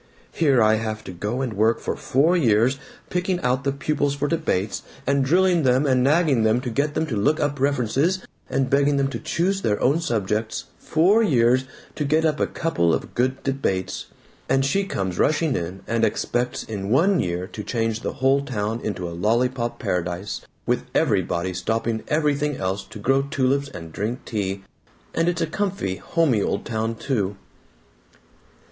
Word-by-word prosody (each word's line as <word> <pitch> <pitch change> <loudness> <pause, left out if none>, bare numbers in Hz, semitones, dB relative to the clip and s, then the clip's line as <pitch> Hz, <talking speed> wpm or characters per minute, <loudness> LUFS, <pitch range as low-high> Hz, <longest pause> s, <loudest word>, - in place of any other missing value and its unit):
Here 140 -8 +3
I 110 0 +4
have 110 -1 -4
to - - -7
go 105 +8 -3
and 125 -4 -2
work 110 +3 +2
for - - -3
four 155 +7 +2
years, 125 -3 +3 0.3
picking 180 0 0
out 125 0 +1
the 140 - +1
pupils 140 0 -1
for 145 +1 -1
debates, 145 - -1 0.2
and 140 0 +2
drilling 175 +4 +3
them, 130 +1 +3
and 130 -2 +3
nagging 150 -2 +3
at - - +2
them 110 +2 +3
to 125 -2 -4
get 145 +5 0
them 160 - +1
to 135 -8 -3
look 145 +10 +2
up 145 -2 -1
references, 140 - +1 0.3
and 135 -1 +1
begging 140 +1 +3
them 135 0 +1
to - - -5
choose 190 +3 0
their 105 - 0
own 140 +6 +3
subjects 110 - -1 0.2
four 185 +8 +3
years, 130 - +3 0.3
to 150 - -3
get 155 +3 +2
up 155 -1 +1
a - - +2
couple 85 - +1
of - - -6
good 130 +2 0
debates! 130 -9 -2 0.4
And 135 +1 +3
she 195 +8 +1
comes 95 - -3
rushing 155 -2 +2
in, 90 +3 -4
and 115 0 0
expects 120 +2 0
in 100 -3 -5
one 175 - +4
year 90 0 -1
to 105 - -5
change 115 -1 -1
the - - -4
whole 135 +1 +2
town 110 -3 -2
into 90 -4 -3
a 85 - -6
lollypop 120 +6 0
paradise 90 +2 -3 0.2
with - - 0
everybody 90 +2 +1
stopping 110 +5 -1
everything 150 -2 +1
else 95 +1 -2
to 95 - -11
grow 135 +6 +2
tulips 140 0 0
and 85 - -9
drink 110 +5 -3
tea. 100 -3 -3 0.5
And 165 +1 +2
it's 170 -1 -2
a - - +3
comfy 175 - -2
homey 145 -11 +1
old - - -1
town, 115 0 -2
too!" 105 -6 -2
130 Hz, 180 wpm, -23 LUFS, 110-145 Hz, 0.5 s, I